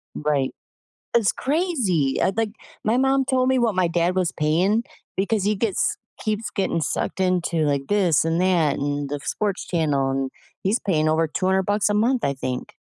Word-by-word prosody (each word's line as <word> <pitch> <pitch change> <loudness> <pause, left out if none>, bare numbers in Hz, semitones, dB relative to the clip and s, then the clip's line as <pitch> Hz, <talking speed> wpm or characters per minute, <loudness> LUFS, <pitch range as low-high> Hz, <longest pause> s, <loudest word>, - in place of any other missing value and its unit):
Right. 145 -3 0 0.6
It's 230 -5 +4
crazy. 255 - 0
I 190 - +2
like, 225 -1 0 0.3
my 220 +3 +2
mom 270 +1 +3
told 255 0 +1
me 260 0 +3
what 230 -4 +2
my 185 -2 +2
dad 170 +1 +1
was 185 -2 0
paying 180 +9 +1 0.3
because 200 +1 0
he 210 +1 +2
gets 205 -2 0 0.3
keeps 215 +1 -2
getting 190 -4 -1
sucked 175 - -2
into, 180 -2 +1
like, 140 -3 +1
this 180 -8 +3
and 165 +1 0
that 180 -5 +3
and 145 0 -2
the 145 0 -4
sports 205 -3 -2
channel, 145 -6 0
and 135 0 -1 0.3
he's 205 +6 +1
paying 155 -6 +1
over 160 +1 +2
200 190 +4 +1
bucks 205 +1 +1
a 210 - 0
month, 235 +4 +2
I 140 - +1
think. 130 -1 -5
185 Hz, 180 wpm, -23 LUFS, 155-215 Hz, 0.6 s, It's